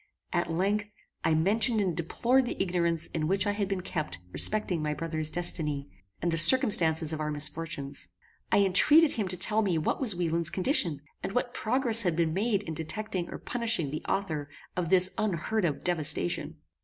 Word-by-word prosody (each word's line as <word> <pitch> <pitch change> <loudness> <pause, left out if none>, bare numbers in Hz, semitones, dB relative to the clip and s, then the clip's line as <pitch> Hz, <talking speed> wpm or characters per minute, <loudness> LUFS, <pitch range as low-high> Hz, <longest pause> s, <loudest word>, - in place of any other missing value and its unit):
At 175 -1 -1
length, 205 +5 -1 0.3
I 160 - +1
mentioned 215 +8 +1
and 185 -5 -1
deplored 245 +9 0
the - - -5
ignorance 170 -3 0
in 155 -2 -2
which 195 +3 +1
I 205 - 0
had 205 -1 -3
been 195 -1 -3
kept 155 - -5
respecting 195 - +7
my 150 0 -2
brother's 155 0 -2
destiny, 150 -4 -1 0.3
and 170 - 0
the 165 - +1
circumstances 165 - +4
of 155 - -5
our 155 0 -3
misfortunes. 150 - -5 0.4
I - - +4
entreated 295 - +4
him 210 -4 -3
to 180 0 -3
tell 210 +5 +2
me 190 -6 0
what 155 - -2
was 225 -8 0
Wieland's 170 -1 -1
condition, 175 - 0 0.2
and - - -5
what 245 0 -2
progress 230 -1 +2
had 175 -6 -1
been 165 -1 0
made 205 +1 -1
in 165 - -6
detecting 175 +3 -4
or - - -7
punishing 225 - -1
the 155 - -6
author 155 -7 -3 0.3
of 175 -3 -3
this 185 0 +4
unheard 210 +1 -1
of 150 -4 -3
devastation. 155 - -1
175 Hz, 180 wpm, -27 LUFS, 160-205 Hz, 0.4 s, respecting